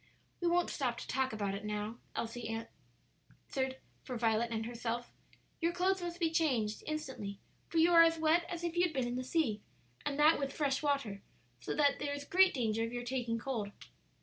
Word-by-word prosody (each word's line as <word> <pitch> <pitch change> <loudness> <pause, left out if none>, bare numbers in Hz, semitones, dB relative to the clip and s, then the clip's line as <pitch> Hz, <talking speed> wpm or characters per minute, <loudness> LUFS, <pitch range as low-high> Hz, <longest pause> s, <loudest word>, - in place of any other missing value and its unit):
"We 350 - 0
won't 350 +1 +2
stop 245 -5 -1
to - - -7
talk 265 0 0
about 205 -3 -2
it 200 +1 -5
now," 210 +2 -3 0.2
Elsie 235 +1 -3
said, 225 +1 -4 0.8
answering 265 -1 -1 0.3
for 250 - -4
Violet 225 0 +2
and 225 -1 -2
herself; 240 0 -3 0.5
"your 335 0 +2
clothes 370 +1 +1
must 345 0 -4
be 330 -2 +2
changed 250 -11 +1
instantly, 265 -10 -4 0.3
for 335 - -2
you 330 +2 +6
are 335 -1 +9
as 330 0 +5
wet 320 +2 +3
as 345 -1 -4
if 340 -1 -2
you 345 - +3
had 355 -3 +2
been 260 -3 0
in 240 - -2
the 255 - -2
sea; 255 -7 0 0.4
and 280 - -2
that 305 +2 +6
with 275 -1 -2
fresh 280 -3 0
water, 275 -9 0 0.4
so 120 - -3
that 285 -2 +3
there 285 -1 -2
is 285 0 -6
great 380 +4 +5
danger 225 -3 +1
of 230 - -2
your 245 0 -3
taking 240 -2 -1
cold." 230 -5 -3
265 Hz, 205 wpm, -34 LUFS, 230-320 Hz, 0.8 s, are